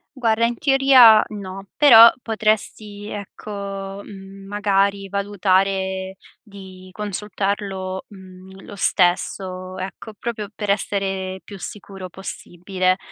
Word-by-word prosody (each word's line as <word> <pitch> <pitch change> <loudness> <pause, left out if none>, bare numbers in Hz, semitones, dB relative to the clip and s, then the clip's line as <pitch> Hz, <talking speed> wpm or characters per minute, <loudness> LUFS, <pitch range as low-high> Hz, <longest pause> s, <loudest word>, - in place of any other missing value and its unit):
Guarda, 230 -3 +1
in 235 +1 -1
teoria 270 -5 +6
no. 195 -1 -8
Però 235 -6 +9
potresti, 215 -2 -2
ecco, 200 -1 -7
mhmm, 195 0 -12
magari 200 -1 0
valutare 190 -1 0 0.2
di 190 -3 -13
consultarlo, 195 -1 -4
mhmm, 190 -1 -14
lo 205 - -10
stesso, 185 0 0
ecco, 195 +4 -7
proprio 215 -1 -5
per 210 -1 -5
essere 195 -2 -2
più 200 - -10
sicuro 195 -1 -9
possibile. 185 0 -3
195 Hz, 100 wpm, -21 LUFS, 190-210 Hz, 0.2 s, Però